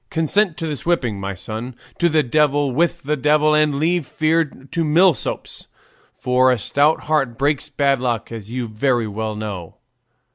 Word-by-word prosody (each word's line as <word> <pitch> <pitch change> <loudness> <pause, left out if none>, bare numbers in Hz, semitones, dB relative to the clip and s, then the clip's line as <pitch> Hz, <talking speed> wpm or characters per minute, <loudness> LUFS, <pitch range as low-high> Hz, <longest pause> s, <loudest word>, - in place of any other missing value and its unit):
Consent 170 +2 +1
to 165 - -4
this 150 -3 -4
whipping, 125 - 0
my 100 0 -4
son; 110 +6 -7 0.2
to 170 - +3
the 155 -1 +2
devil 145 +1 +1
with 170 +5 0
the 150 +2 0
devil, 150 +2 +3
and 150 -1 +3
leave 160 +1 0
fear 160 +1 +1
to 145 +3 -5
milksops, 165 +2 +1 0.5
for 130 0 +3
'a 125 - +2
stout 145 +8 +1
heart 140 -6 0
breaks 145 +2 0
bad 140 -2 +1
luck,' 120 -3 -2
as 110 -3 -8
you 120 0 -3
very 120 +2 0
well 110 +1 -4
know." 100 -6 -6
140 Hz, 170 wpm, -20 LUFS, 120-155 Hz, 0.5 s, to